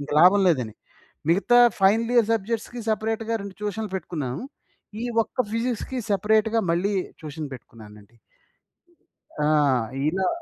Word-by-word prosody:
ఇంక 145 - -8
లాభం 185 +4 +7
లేదని. 125 -10 0 0.6
మిగతా 240 +7 +4 0.2
ఫైనల్ 225 +5 +3
ఇయర్ 230 -3 +4
సబ్జెక్ట్స్‌కి 225 +2 -3
సెపరేట్‌గా 225 +1 -1
2 200 -2 -8
ట్యూషన్‌లు 210 0 -3
పెట్టుకున్నాను. 155 - -4 0.6
ఈ - - -2 0.2
ఒక్క 225 - -31
ఫిజిక్స్‌కి 245 +2 -2
సెపరేట్‌గా 220 +3 +2
మళ్ళీ 195 +4 0 0.3
ట్యూషన్ 155 -1 -6
పెట్టుకున్నానండి. 110 -2 -14 1.2
ఆ! 150 - +1 0.6
ఇలా 185 +4 0
200 Hz, 115 wpm, -24 LUFS, 155-225 Hz, 1.2 s, లాభం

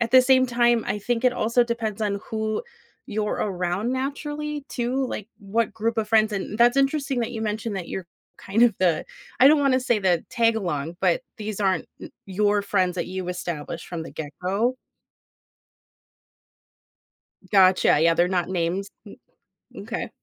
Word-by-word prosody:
at 235 -1 0
the 255 +1 +8
same 260 0 +4
time, 240 -1 +2
I - - -1
think 240 +4 -2
it 250 - +5
also 235 +1 +2
depends 225 -3 -3
on 200 -1 -1
who 220 - -2 0.4
you're 210 0 -2
around 190 +4 -1
naturally 295 +2 -4
too, 255 +2 -1
like, 215 -2 -6
what 215 +2 -1
group 225 +1 -1
of 215 -1 -1
friends 220 -1 +3
and 200 +1 -3
that's 240 +2 +5
interesting 275 -1 +1
that 230 - -2
you 220 -1 -4
mentioned 215 0 -3
that 180 -3 -5
you're 185 -3 -5 0.3
kind 210 +4 0
of 240 -2 +5
the 175 -4 +2 0.4
I 265 - +9
don't 300 0 +5
wanna 270 -2 +3
say 245 -3 +1
the 180 -4 +1
tagalong, 180 -9 0
but 180 -3 +2 0.2
these 215 -1 -5
aren't 190 -4 +1
n - - -9 0.2
your 205 +1 +1
friends 185 -3 +1
that 170 - -2
you 185 0 -5
established 170 -2 -5
from 170 -2 -5
the - - -9
get-go? 185 - -2 2.8
Gotcha. 185 -5 +5
Yeah, 165 +1 +4
they're 175 +1 +3
not 180 -2 0
names, 185 +2 -2 0.8
n - - -8
okay. - - -4
215 Hz, 165 wpm, -24 LUFS, 185-240 Hz, 2.8 s, I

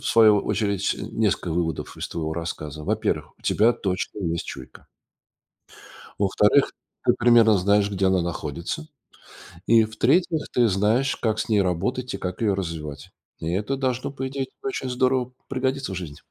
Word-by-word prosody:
в - - -18
свою 110 -2 +6
очередь, 100 -2 0
несколько 105 -6 -1
выводов, 80 -2 -2
из - - -5
твоего 80 -2 -3
рассказа. 75 -3 -5
Во-первых, - - -2
у - - -27
тебя 115 +3 +4
точно 95 -2 -3
есть 85 -4 -2
чуйка 65 -2 -10 1.3
во-вторых, 105 +6 +3 0.3
ты - - +5
примерно 115 -2 +6
знаешь, 100 +2 +3
где 95 -1 0
она 95 -1 +3
находится. 85 - -4 0.8
И, 115 -1 +6
в-третьих, 155 +9 +1
ты 120 -2 +4
знаешь, 110 +7 +2
как 110 -2 0
с - - -3
ней 105 -2 +4
работать 100 +8 -1
и - - -3
как 90 0 -5
её 105 -4 +2
развивать. 80 -6 -5 0.3
И 80 - -3
это 105 +9 -1
должно, 130 -1 -1
по 135 -1 -4
идее, 135 0 -3 0.2
очень 395 - -3
здорово 125 0 +1 0.2
пригодиться 130 -2 -1
в - - -4
жизни. 80 -5 -7
105 Hz, 160 wpm, -24 LUFS, 90-125 Hz, 1.3 s, свою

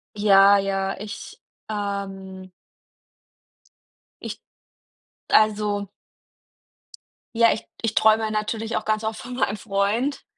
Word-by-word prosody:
Ja, 200 -1 +6
ja, 195 0 -1
ich, 210 +2 -9 0.3
ähm 195 -2 -5 1.7
ich - - -7 0.9
Also 210 -2 +2 1.5
ja, 230 0 +5
ich 220 - -4 0.2
ich 225 -1 -1
träume 220 0 +3
natürlich 215 +2 -2
auch 215 - -2
ganz 215 0 -1
oft 220 0 -3
von 250 - -8
meinem 230 -4 0
Freund. 210 +7 -1
210 Hz, 100 wpm, -23 LUFS, 200-220 Hz, 1.7 s, Ja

